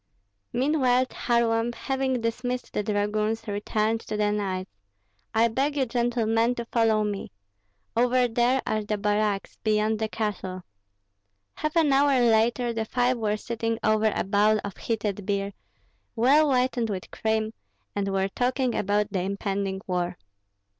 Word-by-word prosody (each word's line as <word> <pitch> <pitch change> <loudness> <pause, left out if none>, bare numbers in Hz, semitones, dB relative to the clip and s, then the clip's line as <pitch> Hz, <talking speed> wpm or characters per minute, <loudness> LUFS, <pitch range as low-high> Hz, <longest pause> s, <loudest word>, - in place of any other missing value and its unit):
Meanwhile 255 -2 +2
Kharlamp, 235 -1 +1
having 265 -2 -1
dismissed 245 +2 -3
the - - 0
dragoons, 210 +1 -1
returned 215 +2 0
to 210 - -4
the 210 0 +2
knights. 190 -3 -2 0.6
"I 225 +1 +4
beg 275 +6 -1
you, 270 - +2
gentlemen, 235 -1 +1
to 235 - -4
follow 225 -2 +2
me. 205 - -4 0.6
Over 250 +1 +3
there 240 +3 +2
are 215 0 -1
the 210 0 -2
barracks, 205 -1 0
beyond 215 0 +1
the 220 - 0
castle." 190 -4 -3 0.9
Half 305 +1 -3
an 315 -4 +4
hour 275 -1 +4
later 235 +1 +3
the 225 -1 -2
five 245 +2 +1
were 210 -1 0
sitting 230 +1 -2
over 215 0 +3
a - - 0
bowl 210 +2 +3
of 200 - -6
heated 210 -3 -2
beer, 200 0 -1 0.6
well 275 +7 +5
whitened 250 -3 +1
with 190 -3 -5
cream, 220 0 -1 0.4
and 200 -1 -1
were 195 0 +1
talking 250 +3 0
about 205 +1 0
the 190 - 0
impending 195 0 -2
war. 180 -1 -2
220 Hz, 145 wpm, -26 LUFS, 210-245 Hz, 0.9 s, well